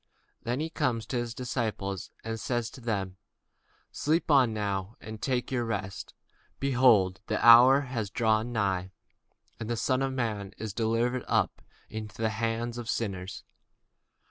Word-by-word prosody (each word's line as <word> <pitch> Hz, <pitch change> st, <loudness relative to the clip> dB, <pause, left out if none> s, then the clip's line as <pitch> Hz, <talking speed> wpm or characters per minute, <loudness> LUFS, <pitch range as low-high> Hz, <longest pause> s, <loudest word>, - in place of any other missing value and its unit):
Then 130 Hz, +7 st, -2 dB
cometh 125 Hz, -8 st, 0 dB
he -, -, -14 dB
to 130 Hz, -, -1 dB
his 120 Hz, -1 st, -3 dB
disciples, 110 Hz, -6 st, -3 dB
and 115 Hz, 0 st, -4 dB
saith 120 Hz, -1 st, -2 dB
unto 130 Hz, -, -12 dB
them, 100 Hz, -5 st, -2 dB, 0.7 s
Sleep 160 Hz, +2 st, 0 dB
on 130 Hz, -5 st, +5 dB
now, 100 Hz, -1 st, -2 dB
and 110 Hz, -1 st, -9 dB
take 125 Hz, -2 st, -1 dB
your 125 Hz, -2 st, 0 dB
rest: 100 Hz, -4 st, -4 dB, 0.4 s
behold, 120 Hz, -9 st, +4 dB
the -, -, 0 dB
hour 130 Hz, +4 st, +8 dB
is 110 Hz, -4 st, -2 dB
at -, -, -17 dB
hand, 110 Hz, -5 st, +1 dB, 0.7 s
and 110 Hz, -, -5 dB
the 120 Hz, -, -1 dB
Son 130 Hz, +3 st, +1 dB
of 135 Hz, 0 st, 0 dB
man 105 Hz, -6 st, -3 dB
is 110 Hz, -3 st, -5 dB
betrayed 115 Hz, +3 st, 0 dB, 0.6 s
into 110 Hz, 0 st, -7 dB
the 110 Hz, -1 st, +1 dB
hands 115 Hz, +2 st, -2 dB
of 115 Hz, -1 st, -6 dB
sinners. 95 Hz, -4 st, -3 dB
115 Hz, 145 wpm, -29 LUFS, 105-125 Hz, 0.7 s, hour